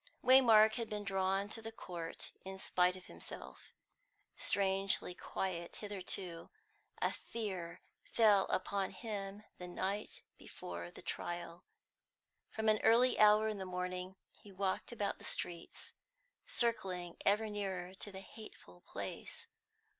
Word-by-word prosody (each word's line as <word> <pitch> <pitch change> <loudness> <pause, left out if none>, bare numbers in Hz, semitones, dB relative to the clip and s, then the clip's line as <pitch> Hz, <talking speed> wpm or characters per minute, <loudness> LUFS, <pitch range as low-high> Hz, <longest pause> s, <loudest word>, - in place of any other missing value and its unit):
Waymark 225 -4 +8
had 230 -2 -2
been 210 -1 -3
drawn 195 0 +1
to 225 - -4
the 225 0 -6
court 170 -6 -6
in 190 0 -6
spite 180 -1 +2
of 185 - -13
himself. - - -10 0.6
Strangely 195 -2 +2
quiet 175 -1 -3
hitherto, 185 -4 -5 0.5
a - - +1
fear 185 -6 -4 0.3
fell 210 -4 +6
upon 195 +1 0
him 200 +1 -5 0.2
the 180 - -5
night 195 +3 -3 0.2
before 85 0 -7
the - - -12
trial. 175 0 -4 0.8
From 220 0 -2
an 215 -1 +5
early 240 +3 +5
hour 215 +1 +7
in 215 -2 -2
the - - -2
morning 180 0 -3 0.2
he 205 - -15
walked 190 +3 -1
about 210 -4 -1
the - - -13
streets, 170 -1 -5 0.5
circling 185 -7 0
ever 210 +2 +3
nearer 190 -3 -3
to 205 +2 -6
the 190 0 -7
hateful 195 - -12
place. - - -5
195 Hz, 130 wpm, -36 LUFS, 180-215 Hz, 0.8 s, Waymark